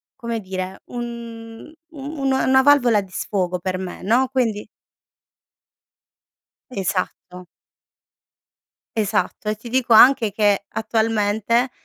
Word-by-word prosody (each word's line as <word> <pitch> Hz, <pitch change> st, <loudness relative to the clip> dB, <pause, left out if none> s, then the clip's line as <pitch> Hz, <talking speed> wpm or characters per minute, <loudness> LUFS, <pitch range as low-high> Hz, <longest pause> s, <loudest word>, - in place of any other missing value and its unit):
come 235 Hz, -3 st, -4 dB
dire, 185 Hz, 0 st, -5 dB
un 235 Hz, +1 st, -8 dB, 0.2 s
un 290 Hz, +1 st, -8 dB
un 270 Hz, -1 st, 0 dB
una 265 Hz, 0 st, +4 dB
valvola 245 Hz, -7 st, +4 dB
di 190 Hz, -1 st, -14 dB
sfogo 185 Hz, -2 st, -2 dB
per 185 Hz, +1 st, -3 dB
me, 185 Hz, -1 st, -7 dB
no? 245 Hz, +6 st, +2 dB
Quindi 225 Hz, -6 st, -1 dB, 2.0 s
Esatto. 185 Hz, -2 st, -4 dB, 1.5 s
Esatto, 210 Hz, 0 st, -1 dB
e 215 Hz, -, +1 dB
ti 225 Hz, +2 st, -11 dB
dico 250 Hz, -2 st, +2 dB
anche 230 Hz, -3 st, +6 dB
che 205 Hz, -1 st, +2 dB
attualmente, 220 Hz, +2 st, 0 dB
225 Hz, 105 wpm, -21 LUFS, 200-245 Hz, 2.0 s, anche